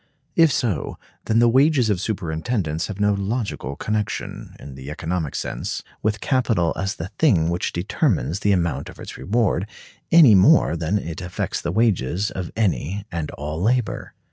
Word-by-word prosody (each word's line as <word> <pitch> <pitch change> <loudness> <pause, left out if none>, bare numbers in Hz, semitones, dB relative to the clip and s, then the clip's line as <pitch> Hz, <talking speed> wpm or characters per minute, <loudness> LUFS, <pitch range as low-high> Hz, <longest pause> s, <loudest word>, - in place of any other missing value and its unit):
If 165 -3 +5
so, 110 - -1 0.3
then 110 - +1
the 120 +1 +5
wages 130 -1 +4
of 95 -3 -1
superintendence 85 -3 -2
have 105 -2 -7
no 105 0 +3
logical 100 - -3
connection, 105 +5 -3
in 70 - -9
the 65 +1 -9
economic 80 -1 -3
sense, - - -4 0.2
with 110 0 -1
capital 115 - +1
as 95 +1 -2
the 80 +3 -6
thing 90 - +4
which 85 +1 -1
determines 95 - 0
the 105 - +2
amount 85 -4 0
of - - -12
its - - -8
reward, 100 - 0 0.4
any 160 -9 +8
more 100 - +5
than 85 +5 0
it 85 -5 -5
affects 90 0 -3
the 85 - -2
wages 100 - +1
of 90 -3 -5
any 100 -2 0
and 80 -3 -3
all 75 +3 -5
labor. 120 +3 0
95 Hz, 165 wpm, -22 LUFS, 85-115 Hz, 0.4 s, any